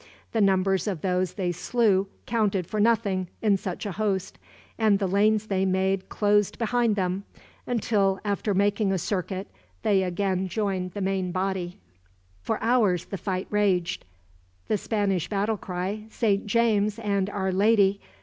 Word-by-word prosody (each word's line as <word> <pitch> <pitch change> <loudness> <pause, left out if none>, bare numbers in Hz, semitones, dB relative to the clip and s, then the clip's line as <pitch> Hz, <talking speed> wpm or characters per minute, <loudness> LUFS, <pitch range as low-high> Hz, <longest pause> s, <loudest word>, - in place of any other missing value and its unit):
The 225 - +1
numbers 190 -1 +2
of 185 -7 -2
those 185 -1 0
they 185 -3 -1
slew 195 +1 +1 0.2
counted 205 -5 0
for 215 - -3
nothing, 205 -4 +2 0.2
in 210 -2 +4
such 190 +1 -4
a 205 - -2
host; 195 -1 -2 0.4
and 215 -3 +4
the 195 - -1
lanes 210 +3 +2
they 195 -3 0
made 190 0 0
closed 205 -1 +2
behind 235 -1 +1
them, 185 0 -1 0.4
until, 200 -5 +1
after 205 0 0
making 200 +1 +2
a 190 - +1
circuit, 190 +1 -3 0.4
they 195 -2 +3
again 185 +1 -1
joined 185 -2 -2
the 205 - -4
main 190 -1 -1
body. 185 -1 -2 0.6
For - - -1
hours 220 -7 +2
the 195 - -5
fight 185 -2 -2
raged. 195 -4 +1 0.7
The 215 - +2
Spanish 195 -6 -1
battle 210 +1 0
cry, 190 +4 -4
"Saint 210 -3 0
James 215 -2 +2
and 200 -3 0
Our 190 -2 -1
Lady!" 200 0 +3
195 Hz, 150 wpm, -26 LUFS, 190-210 Hz, 0.7 s, in